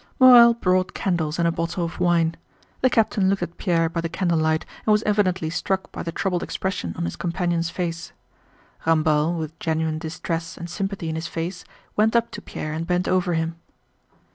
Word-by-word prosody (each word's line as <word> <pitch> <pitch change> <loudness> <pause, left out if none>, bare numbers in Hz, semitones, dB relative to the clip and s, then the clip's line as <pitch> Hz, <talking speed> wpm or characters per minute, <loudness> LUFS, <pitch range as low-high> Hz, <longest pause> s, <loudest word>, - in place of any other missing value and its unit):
Morel 240 -2 +9
brought 185 -4 +1
candles 165 -5 -1
and 170 -1 +2
a - - +2
bottle 170 +1 -2
of 165 - -7
wine. 165 -2 +2 0.5
The 260 - +4
captain 210 -4 +2
looked 195 0 0
at 170 - -7
Pierre 165 -4 +2
by 170 +1 -3
the 165 - -3
candlelight 160 -3 +1 0.2
and 215 - +2
was 210 +1 +3
evidently 190 -6 +1
struck 190 +3 -2
by - - -6
the 165 - -4
troubled 180 +1 -1
expression 185 - -3
on - - -2
his 85 - -4
companion's 170 -1 -1
face. 170 -1 -4 0.8
Ramballe, 155 +1 +3
with 160 0 -6
genuine 160 -1 -1
distress 165 +1 -4
and 170 - -6
sympathy 195 -3 -3
in 160 - -2
his 160 +1 -3
face, 170 +2 -5 0.3
went 220 +2 +3
up 235 0 +2
to - - -7
Pierre 155 - -5
and 165 +1 -4
bent 180 0 0
over 180 -2 +1
him. 165 +1 -2
170 Hz, 190 wpm, -23 LUFS, 165-190 Hz, 0.8 s, Morel